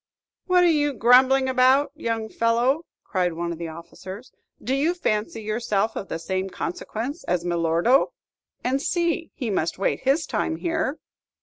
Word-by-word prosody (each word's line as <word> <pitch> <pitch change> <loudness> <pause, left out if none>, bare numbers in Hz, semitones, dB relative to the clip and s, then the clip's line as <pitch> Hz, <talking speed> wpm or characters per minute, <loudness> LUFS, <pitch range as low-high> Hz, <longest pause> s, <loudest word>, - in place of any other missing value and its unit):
"What 365 -1 +5
are - - +5
you 295 -3 +2
grumbling 260 +3 +5
about, 260 +2 +4
young 230 -7 -3
fellow?" 240 +8 +1 0.2
cried 180 -3 0
one 170 +1 -3
of 170 - -6
the 170 - -4
officers. 185 +7 -10 0.3
"Do 255 - -2
you 305 +6 +1
fancy 220 -8 -2
yourself 215 -1 -1
of 195 - -5
the - - -3
same 190 +3 -3
consequence 230 - -5
as 175 -1 -1
Milordo? 170 - +2 0.5
And 265 +2 0
see, 340 0 0
he 235 -5 -3
must 170 -4 -1
wait 195 - 0
his 275 +5 +1
time 320 - -1
here." 320 -3 -1
235 Hz, 160 wpm, -24 LUFS, 190-285 Hz, 0.5 s, What